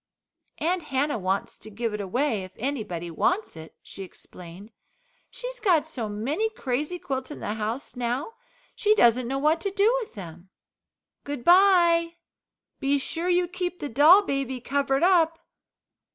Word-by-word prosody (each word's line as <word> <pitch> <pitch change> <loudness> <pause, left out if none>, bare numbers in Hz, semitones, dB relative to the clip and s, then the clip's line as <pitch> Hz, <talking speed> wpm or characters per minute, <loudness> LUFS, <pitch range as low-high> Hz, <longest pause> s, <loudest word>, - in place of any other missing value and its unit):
"Aunt 350 +3 0
Hannah 270 -2 -1
wants 190 +1 -2
to - - -11
give 225 +1 -3
it 210 - -3
away 225 +1 -1
if 185 0 -11
anybody 210 -10 -4
wants 360 - 0
it," 160 0 -11
she - - -10
explained. 185 +2 -12 0.6
"She's - - -7
got 340 -9 +3
so 245 -9 -5
many 275 - -1
crazy 300 - -3
quilts 265 -5 -4
in 295 - -8
the 210 - -3
house 220 +6 -4
now 250 - -3 0.4
she 425 -1 +2
doesn't 240 - +4
know 270 +2 -2
what 305 +4 +2
to 400 - -1
do 405 +5 +2
with 440 - -9
them. 175 -2 -10 0.7
Good 285 -4 -5
bye 345 -2 +5 0.6
be 275 +1 +1
sure 330 +5 -3
you 355 0 +2
keep 360 0 -4
the 290 - -5
doll 310 - +7
baby 275 -6 -2
covered 275 +2 0
up." 335 -3 +4
280 Hz, 155 wpm, -25 LUFS, 225-350 Hz, 0.7 s, doll